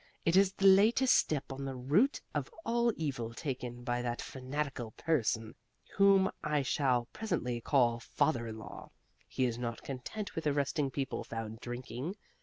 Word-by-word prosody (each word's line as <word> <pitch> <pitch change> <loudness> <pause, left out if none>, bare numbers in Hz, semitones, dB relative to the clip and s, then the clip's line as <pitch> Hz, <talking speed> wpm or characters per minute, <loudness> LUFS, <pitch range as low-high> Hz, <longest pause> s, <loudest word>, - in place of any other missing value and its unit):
"It 165 - +3
is 195 0 +5
the 195 - -1
latest 215 +7 +6
step 140 -3 +1
on 135 +1 -5
the 135 -1 -4
route 150 - +2
of - - -2 0.2
all 235 0 +2
evil 125 -7 -3
taken 125 -4 -4
by 120 0 -1
that 120 -1 -2
fanatical 130 -3 -4
person 115 -8 0 0.4
whom 195 -1 +5
I 150 -2 +1
shall 130 -3 +1
presently 155 - -2
call 120 -3 +3
father 115 0 0
in 110 0 -6
law. 110 - -9 0.4
He 130 - 0
is 120 -1 -2
not 120 -1 -4
content 140 - -5
with 160 -1 -2
arresting 140 0 +1
people 135 0 -3
found 115 -1 -6
drinking. 125 - -5
135 Hz, 160 wpm, -32 LUFS, 120-165 Hz, 0.4 s, latest